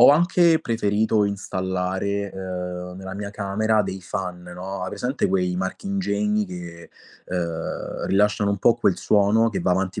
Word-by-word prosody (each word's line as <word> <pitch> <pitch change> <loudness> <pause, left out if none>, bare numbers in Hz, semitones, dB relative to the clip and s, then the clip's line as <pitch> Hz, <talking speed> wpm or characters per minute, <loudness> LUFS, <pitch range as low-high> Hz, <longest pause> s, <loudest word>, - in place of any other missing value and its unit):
ho - - +10
anche 170 +1 +5
preferito 110 -1 +1
installare, 95 0 -2
ehm, 90 -1 -5
nella 95 0 -7
mia 100 0 -5
camera 105 +1 +1
dei 95 -1 -5
fan 90 -2 -4
no, 90 +2 -6
hai 90 - -2
presente 125 -5 -1
quei 90 -1 +1
marchingegni 105 - -1
che, 85 -2 -9 0.4
ehm, 85 -2 -3
rilasciano 105 +1 +2
un 100 - -1
po' 115 +3 +5
quel 90 - +2
suono 105 +2 +4
che 110 - -2
va - - +1
avanti 95 +1 0
100 Hz, 150 wpm, -24 LUFS, 90-105 Hz, 0.4 s, ho